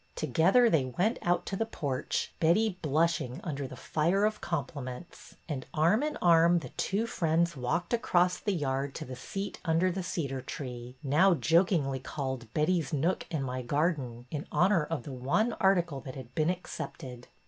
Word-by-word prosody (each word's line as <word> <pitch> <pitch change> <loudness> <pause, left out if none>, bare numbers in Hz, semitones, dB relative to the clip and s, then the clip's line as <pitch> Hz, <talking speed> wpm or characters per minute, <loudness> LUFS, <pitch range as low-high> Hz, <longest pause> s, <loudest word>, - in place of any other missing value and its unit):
Together 170 - +4
they 160 - +3
went 180 - 0
out 175 0 +1
to 195 - -3
the 225 - 0
porch, 145 -12 -3
Betty 185 +4 +2
blushing 155 -4 +1
under 140 -4 -3
the - - -9
fire 175 +6 +1
of 215 0 -1
compliments, 140 -1 -5
and 140 -6 -4
arm 170 - +4
in 300 0 -2
arm 170 0 +6
the 165 - -4
two 205 +4 -1
friends 170 -4 +1
walked 135 - -2
across 180 -6 +2
the 205 - -1
yard 135 -5 -1
to - - -5
the 130 - -7
seat 195 +10 -5
under 170 +2 +2
the 190 +2 -3
cedar 145 -7 -3
tree, 125 -2 -7
now 170 +7 +4
jokingly 165 -5 +2
called 130 -4 -5
Betty's 155 -2 +1
Nook 160 +6 0
in 155 -5 -2
My 130 -1 -3
Garden," 130 -3 -1
in 150 -1 -4
honor 180 -3 +3
of 165 0 -3
the 140 - -7
one 140 - +1
article 175 -7 +2
that 130 -1 -8
had 130 -2 -9
been 155 +1 +1
accepted. 130 -8 -6
160 Hz, 170 wpm, -30 LUFS, 135-180 Hz, -, arm